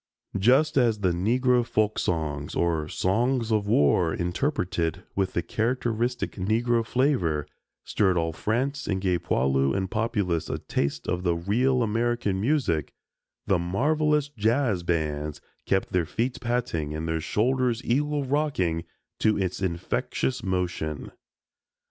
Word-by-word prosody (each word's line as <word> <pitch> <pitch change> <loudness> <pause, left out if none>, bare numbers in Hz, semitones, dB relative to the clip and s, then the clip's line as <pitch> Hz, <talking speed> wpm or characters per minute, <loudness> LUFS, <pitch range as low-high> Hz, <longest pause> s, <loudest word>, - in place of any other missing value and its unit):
Just 140 +9 +4
as 115 -5 +3
the 95 -2 +2
Negro 120 +7 +2
folk 110 -2 0
songs 75 -4 -2
or 80 -3 0
songs 115 +7 0
of 105 -2 +1
war, 80 - +3
interpreted 90 - -1
with 95 -1 0
the 85 - 0
characteristic 120 +4 -1
Negro 115 +4 +1
flavor 110 - +1 0.4
stirred 95 -4 +1
all 80 -1 0
France 130 - -1
and 95 -2 0
gave 90 -3 0
poilu 65 +4 +1
and 95 -1 -2
populace 105 -7 -1
a - - -1
taste 70 0 -2
of 90 - -1
the 85 -2 +1
real 120 +9 +1
American 115 -3 0
music, 110 - 0 0.5
the 95 -4 +2
marvelous 150 - +1
"jazz 115 -4 +1
bands" 75 -3 -2 0.3
kept 95 - +1
their 90 -3 +1
feet 120 +7 -2
patting 120 -12 -1
and 80 +1 -3
their 80 0 -1
shoulders 120 - +1
"eagle 145 +4 +1
rocking" 125 - 0 0.3
to 110 -1 +3
its 95 -1 -2
infectious 125 +8 -1
motion. 90 -6 -2
100 Hz, 130 wpm, -26 LUFS, 85-125 Hz, 0.5 s, Just